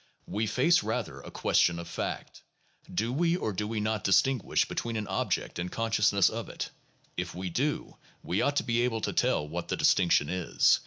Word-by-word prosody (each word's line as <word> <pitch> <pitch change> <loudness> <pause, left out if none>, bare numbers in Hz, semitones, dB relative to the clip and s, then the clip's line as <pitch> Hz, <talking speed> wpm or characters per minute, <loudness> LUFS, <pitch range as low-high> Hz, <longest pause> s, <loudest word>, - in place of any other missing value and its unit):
We 105 +3 -1
face, 160 +10 +4
rather, - - -3
a - - -10
question 85 -1 +2
of 85 0 -6
fact. 85 - -5 0.5
Do 110 +7 -1
we 170 +4 +2
or 110 - -2
do 105 +2 -2
we 110 0 -2
not 110 -1 -1
distinguish 120 +5 +3
between 115 -1 -3
an 110 -1 -2
object 95 -2 -1
and 90 +1 -3
consciousness 105 -4 +3
of 115 +1 -3
it? - - -5 0.5
If - - -3
we 90 0 -4
do, 145 - -1 0.3
we 90 - 0
ought 145 - +1
to - - +2
be 120 0 +1
able 115 -2 0
to - - -2
tell 75 - +1
what 85 +3 -4
the - - -2
distinction 85 -5 +4
is. 90 0 +3
105 Hz, 195 wpm, -29 LUFS, 90-120 Hz, 0.5 s, face